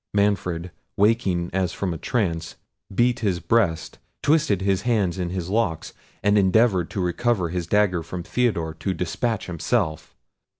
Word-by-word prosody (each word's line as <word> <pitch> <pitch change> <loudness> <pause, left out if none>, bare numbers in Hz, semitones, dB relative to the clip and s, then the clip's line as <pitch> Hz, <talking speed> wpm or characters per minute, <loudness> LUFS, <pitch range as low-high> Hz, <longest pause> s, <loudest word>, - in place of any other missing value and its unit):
Manfred, 90 -4 0 0.3
waking 100 -5 +2
as 95 -2 0
from 95 -3 -2
a - - -5
trance, 85 - -1 0.4
beat 120 +4 +2
his 95 -6 0
breast, 85 -3 0 0.2
twisted 145 - +2
his 95 -1 +1
hands 100 -7 0
in 90 -1 -1
his 90 -2 -4
locks, 95 -5 -1 0.3
and 105 0 +4
endeavoured 95 -2 +3
to - - -5
recover 95 +1 0
his 85 -1 -3
dagger 100 -3 +2
from 85 +2 -6
Theodore 85 -9 0
to 95 +3 -3
despatch 105 +6 -2
himself. 80 -2 -2
95 Hz, 145 wpm, -24 LUFS, 85-105 Hz, 0.4 s, and